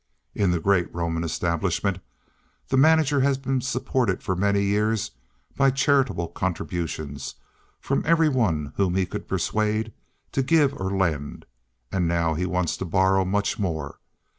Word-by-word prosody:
In 100 Hz, -3 st, +1 dB
the 90 Hz, -1 st, +1 dB
great 90 Hz, 0 st, +1 dB
Roman 85 Hz, -1 st, -1 dB
establishment 85 Hz, +3 st, -1 dB, 0.7 s
the -, -, +1 dB
manager 150 Hz, 0 st, +4 dB
has 135 Hz, 0 st, +2 dB
been 135 Hz, -1 st, -1 dB
supported 125 Hz, -4 st, -1 dB
for 95 Hz, -, -1 dB
many 100 Hz, +2 st, +2 dB
years 105 Hz, -, 0 dB, 0.4 s
by 135 Hz, -1 st, +4 dB
charitable 130 Hz, -, +1 dB
contributions 80 Hz, -5 st, -4 dB, 0.4 s
from -, -, -1 dB
every 165 Hz, 0 st, +4 dB
one 90 Hz, -, 0 dB
whom 95 Hz, -3 st, +1 dB
he 95 Hz, -1 st, +2 dB
could 90 Hz, -, -7 dB
persuade 110 Hz, +3 st, -1 dB, 0.4 s
to 135 Hz, -, +1 dB
give 145 Hz, 0 st, +3 dB
or 95 Hz, -5 st, -3 dB
lend, 85 Hz, -7 st, -2 dB, 0.5 s
and 90 Hz, -3 st, 0 dB
now 85 Hz, -1 st, +1 dB
he 90 Hz, +4 st, -1 dB
wants 90 Hz, -2 st, -1 dB
to -, -, -4 dB
borrow 95 Hz, +2 st, +3 dB
much 105 Hz, +4 st, 0 dB
more. 80 Hz, -7 st, -3 dB
95 Hz, 145 wpm, -24 LUFS, 85-125 Hz, 0.7 s, manager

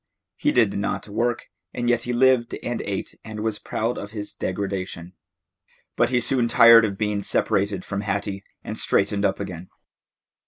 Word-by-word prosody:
He -, -, +1 dB
did 110 Hz, -5 st, +3 dB
not 100 Hz, +1 st, -2 dB
work, 115 Hz, +3 st, -1 dB, 0.3 s
and 120 Hz, -1 st, -2 dB
yet 120 Hz, -1 st, +2 dB
he -, -, +2 dB
lived 125 Hz, -1 st, +3 dB
and 120 Hz, -1 st, -2 dB
ate 100 Hz, -1 st, -4 dB
and 110 Hz, -1 st, -7 dB
was 110 Hz, -1 st, -2 dB
proud 115 Hz, +3 st, -2 dB
of 100 Hz, -, -7 dB
his 105 Hz, -1 st, -6 dB
degradation. 95 Hz, -2 st, -4 dB, 0.8 s
But -, -, +2 dB
he 125 Hz, -1 st, +2 dB
soon 125 Hz, -1 st, +1 dB
tired 115 Hz, -1 st, +8 dB
of 100 Hz, -2 st, -3 dB
being 105 Hz, -1 st, -1 dB
separated 100 Hz, -1 st, 0 dB
from 100 Hz, 0 st, -3 dB
Hattie, 100 Hz, -1 st, -3 dB, 0.2 s
and -, -, -4 dB
straightened 100 Hz, +1 st, +1 dB
up 95 Hz, -, 0 dB
again. 90 Hz, -3 st, -6 dB
105 Hz, 165 wpm, -23 LUFS, 100-115 Hz, 0.8 s, tired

